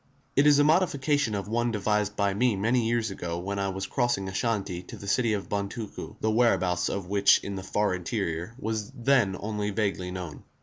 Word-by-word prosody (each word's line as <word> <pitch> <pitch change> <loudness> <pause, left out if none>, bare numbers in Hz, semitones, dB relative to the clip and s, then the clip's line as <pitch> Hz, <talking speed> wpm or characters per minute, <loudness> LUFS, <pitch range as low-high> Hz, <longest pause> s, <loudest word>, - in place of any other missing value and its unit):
It 140 +2 +5
is 145 -1 +7
a 145 - +5
modification 145 - +2
of 100 -1 -3
one 120 +2 0
devised 105 -1 0
by 100 -1 +1
me 120 +2 +2
many 115 +4 +1
years 115 -2 0
ago 85 -3 -4
when 100 +3 -3
I 100 0 0
was 95 0 -3
crossing 120 -7 0
Ashanti 95 -2 -2
to 90 - -10
the 100 - -9
city 115 +2 +2
of 100 -2 -3
Bontuku, 100 +2 -4
the 110 - +1
whereabouts 95 -6 +2
of 100 -2 -3
which 100 +1 +5
in 100 - -4
the 95 - -4
far 105 +1 0
interior 90 +1 -3
was 110 -3 -3
then 120 -7 +2
only 105 -1 -2
vaguely 100 -3 -1
known. 90 -5 -6
105 Hz, 200 wpm, -27 LUFS, 95-115 Hz, -, is